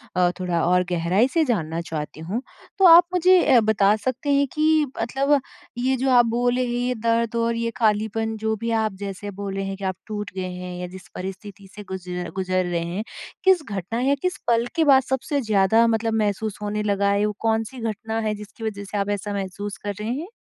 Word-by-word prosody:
अ, 180 Hz, -1 st, +4 dB
थोड़ा 175 Hz, -2 st, 0 dB
और 180 Hz, +1 st, +3 dB
गहराई 175 Hz, +8 st, +2 dB
से 330 Hz, -2 st, +3 dB
जानना 165 Hz, -, -1 dB
चाहती 155 Hz, -2 st, -6 dB
हूँ। 195 Hz, +10 st, -3 dB, 0.4 s
तो 385 Hz, -, +6 dB
आप 340 Hz, +1 st, +10 dB
मुझे 365 Hz, +1 st, +5 dB, 0.2 s
ए -, -, +8 dB
बता 205 Hz, -1 st, +4 dB
सकते 260 Hz, +6 st, -3 dB
हैं 280 Hz, 0 st, +3 dB
कि 310 Hz, 0 st, +3 dB, 0.2 s
मतलब 275 Hz, +5 st, +2 dB, 0.4 s
ये 260 Hz, +2 st, +1 dB
जो 265 Hz, +2 st, 0 dB
आप 240 Hz, -1 st, +6 dB
बोले 245 Hz, +2 st, +1 dB
हैं, -, -, -4 dB, 0.2 s
ये 250 Hz, -, 0 dB
दर्द 230 Hz, +1 st, 0 dB
और 230 Hz, 0 st, +1 dB
ये 230 Hz, 0 st, -1 dB
खालीपन, 220 Hz, 0 st, 0 dB
जो 220 Hz, 0 st, -1 dB
भी 230 Hz, +2 st, -3 dB
आप 215 Hz, -2 st, -1 dB
जैसे 200 Hz, +1 st, -6 dB
बोले 195 Hz, 0 st, -4 dB
हैं 195 Hz, 0 st, -4 dB
कि 200 Hz, -, -10 dB
आप 190 Hz, -1 st, -1 dB
टूट 210 Hz, -2 st, -5 dB
गए 185 Hz, -1 st, -3 dB
हैं 180 Hz, 0 st, -6 dB
या 180 Hz, -, -4 dB
जिस 190 Hz, +1 st, -12 dB
परिस्थिति 195 Hz, +1 st, -8 dB
से 210 Hz, -, -8 dB
गुज़ 180 Hz, -1 st, -7 dB, 0.3 s
गुज़र 185 Hz, -1 st, 0 dB
रहे 170 Hz, -1 st, -1 dB
हैं, 185 Hz, +5 st, -3 dB, 0.4 s
किस 375 Hz, -4 st, +4 dB
घटना 200 Hz, +4 st, -3 dB
या 275 Hz, +2 st, +3 dB
किस 365 Hz, 0 st, -1 dB
पल 235 Hz, 0 st, +3 dB
के 325 Hz, -, +3 dB
बाद 270 Hz, -2 st, +6 dB
सबसे 265 Hz, +2 st, -1 dB
ज़्यादा 220 Hz, +1 st, +3 dB
मतलब 225 Hz, 0 st, 0 dB
महसूस 210 Hz, -1 st, -1 dB
होने 210 Hz, 0 st, -2 dB
लगा 200 Hz, -1 st, +1 dB
है? 200 Hz, +1 st, +2 dB
वो 210 Hz, -, -1 dB
कौन-सी 225 Hz, +2 st, -1 dB
घटना 220 Hz, 0 st, -3 dB
है, 215 Hz, -1 st, -1 dB
जिसकी 210 Hz, +2 st, -11 dB
वज़ह 200 Hz, -2 st, -4 dB
से 200 Hz, +1 st, -5 dB
आप 200 Hz, 0 st, -1 dB
ऐसा 205 Hz, 0 st, -2 dB
महसूस 200 Hz, 0 st, -4 dB
कर 205 Hz, 0 st, -2 dB
रहे 215 Hz, +2 st, -3 dB
हैं? 295 Hz, +8 st, -3 dB
215 Hz, 215 wpm, -23 LUFS, 195-240 Hz, 0.4 s, आप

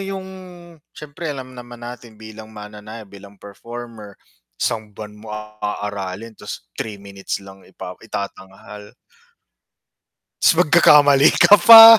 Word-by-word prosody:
yung 195 Hz, -1 st, -5 dB, 0.7 s
siyempre 150 Hz, +2 st, -7 dB
alam 130 Hz, -3 st, -6 dB
naman 120 Hz, -1 st, -11 dB
natin 120 Hz, -2 st, -10 dB
bilang 110 Hz, 0 st, -11 dB
mananayaw, 105 Hz, +1 st, -10 dB
bilang 100 Hz, 0 st, -15 dB
performer, 110 Hz, +1 st, -10 dB, 0.4 s
isang 110 Hz, -3 st, -3 dB
buwan 105 Hz, -1 st, -8 dB
mo 110 Hz, -, -12 dB, 0.3 s
aaralin 105 Hz, +1 st, -5 dB
tas 105 Hz, -, -9 dB
3 105 Hz, -, -6 dB
minutes 100 Hz, -1 st, -6 dB
lang 95 Hz, 0 st, -13 dB
ipa 90 Hz, -1 st, -9 dB
itatanghal. 100 Hz, 0 st, -9 dB, 1.4 s
Tas -, -, +6 dB
magkakamali 150 Hz, -4 st, +6 dB, 0.2 s
ka 205 Hz, -, +9 dB
pa, 225 Hz, -1 st, +13 dB
110 Hz, 115 wpm, -20 LUFS, 100-130 Hz, 1.4 s, pa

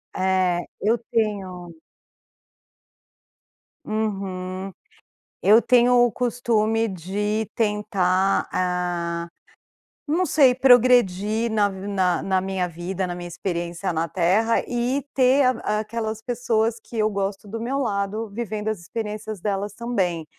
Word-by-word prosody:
É, 185 Hz, -2 st, +1 dB, 0.2 s
eu 220 Hz, +3 st, +2 dB
tenho 185 Hz, -6 st, -2 dB, 2.1 s
uhum, 195 Hz, -3 st, -3 dB, 0.7 s
eu 215 Hz, +4 st, +6 dB
tenho 250 Hz, 0 st, +4 dB
o 240 Hz, -, +2 dB
costume 225 Hz, -2 st, +1 dB
de 205 Hz, +4 st, -2 dB
tentar, 200 Hz, -3 st, +1 dB
ah, 175 Hz, -2 st, -1 dB, 0.8 s
não 335 Hz, +5 st, +1 dB
sei, 270 Hz, -7 st, +4 dB
progredir 235 Hz, -4 st, +4 dB
na 210 Hz, -2 st, +2 dB
vi 190 Hz, 0 st, -7 dB
na 185 Hz, -3 st, +1 dB
na 190 Hz, -1 st, +1 dB
minha 190 Hz, -1 st, -2 dB
vida, 175 Hz, +3 st, -4 dB
na 175 Hz, -, -4 dB
minha 175 Hz, 0 st, -7 dB
experiência 175 Hz, +1 st, -3 dB
na 165 Hz, +1 st, -1 dB
terra, 190 Hz, +7 st, +2 dB
e 245 Hz, +3 st, -1 dB
ter 265 Hz, +1 st, +4 dB
a 230 Hz, -4 st, +1 dB
aquelas 220 Hz, 0 st, -4 dB
pessoas 230 Hz, -1 st, 0 dB
que 235 Hz, -, -9 dB
eu 215 Hz, 0 st, +2 dB
gosto 200 Hz, 0 st, -3 dB
do 225 Hz, +3 st, -5 dB
meu 260 Hz, +4 st, -2 dB
lado, 210 Hz, -2 st, -2 dB
vivendo 215 Hz, -1 st, -3 dB
as 215 Hz, -3 st, -3 dB
experiências 215 Hz, +2 st, -5 dB
delas 200 Hz, +1 st, -2 dB
também. 190 Hz, -8 st, -2 dB
210 Hz, 120 wpm, -23 LUFS, 185-230 Hz, 2.1 s, eu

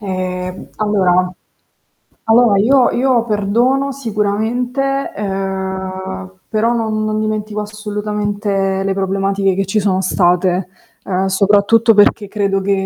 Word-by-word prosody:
Ehm, 185 Hz, -2 st, -4 dB
allora, 185 Hz, -4 st, +1 dB, 0.9 s
allora 225 Hz, -2 st, +4 dB
io 250 Hz, +5 st, +4 dB
io 250 Hz, -2 st, +1 dB
perdono 240 Hz, +6 st, +1 dB
sicuramente, 245 Hz, +4 st, -1 dB
ehm, 190 Hz, -, -4 dB, 0.2 s
però 225 Hz, +2 st, +1 dB
non 220 Hz, -2 st, -1 dB
non 215 Hz, 0 st, -1 dB
dimentico 215 Hz, -1 st, -2 dB
assolutamente 205 Hz, -2 st, -2 dB
le 195 Hz, 0 st, -1 dB
problematiche 195 Hz, 0 st, 0 dB
che 195 Hz, +1 st, 0 dB
ci 195 Hz, +3 st, -1 dB
sono 195 Hz, -2 st, +1 dB
state, 180 Hz, 0 st, +1 dB, 0.4 s
ehm, 190 Hz, 0 st, -1 dB
soprattutto 205 Hz, +4 st, +3 dB
perché 205 Hz, 0 st, +4 dB
credo 200 Hz, -1 st, -1 dB
che 200 Hz, +1 st, 0 dB
205 Hz, 110 wpm, -16 LUFS, 190-220 Hz, 0.9 s, allora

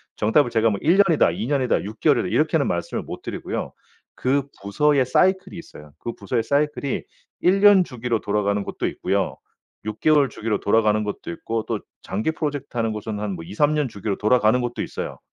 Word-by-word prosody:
정답을 120 Hz, +6 st, +3 dB
제가 115 Hz, -1 st, +2 dB
뭐 100 Hz, -, -2 dB
1 170 Hz, +5 st, +3 dB
년이다 165 Hz, -5 st, +3 dB
2 -, -, -4 dB
년이다 135 Hz, -3 st, +1 dB
6 105 Hz, +3 st, -8 dB
개월이다 -, -, +3 dB
이렇게는 -, -, +2 dB
말씀을 -, -, -2 dB
못 -, -, -8 dB
드리고요. -, -, -4 dB, 0.4 s
그 135 Hz, +2 st, +1 dB, 0.2 s
부서의 135 Hz, +8 st, +2 dB
사이클이 190 Hz, +10 st, +2 dB
있어요. 75 Hz, -, -12 dB
그 120 Hz, -, -5 dB
부서의 120 Hz, -3 st, -1 dB
사이클이 140 Hz, +1 st, 0 dB, 0.4 s
1년 195 Hz, +1 st, +6 dB
주기로 125 Hz, -6 st, -2 dB
돌아가는 100 Hz, -1 st, 0 dB
곳도 -, -, -3 dB
있고요. -, -, -1 dB, 0.5 s
6 110 Hz, 0 st, -5 dB
개월 150 Hz, -3 st, +4 dB
주기로 110 Hz, -1 st, -2 dB
돌아가는 105 Hz, 0 st, +2 dB
것도 105 Hz, -4 st, -5 dB
있고 110 Hz, +6 st, -3 dB
또 -, -, -1 dB, 0.2 s
장기 105 Hz, +10 st, -2 dB
프로젝트 145 Hz, -4 st, -4 dB
하는 115 Hz, -1 st, +1 dB
곳은 105 Hz, 0 st, -5 dB
한 105 Hz, -1 st, -3 dB
뭐 85 Hz, -, -8 dB
2-3 145 Hz, -, +1 dB
년 150 Hz, -2 st, +1 dB
주기로 100 Hz, -1 st, -3 dB
돌아가는 110 Hz, +2 st, +3 dB
곳도 120 Hz, 0 st, -3 dB
있어요. -, -, -5 dB
115 Hz, 390 characters per minute, -23 LUFS, 105-145 Hz, 0.5 s, 1년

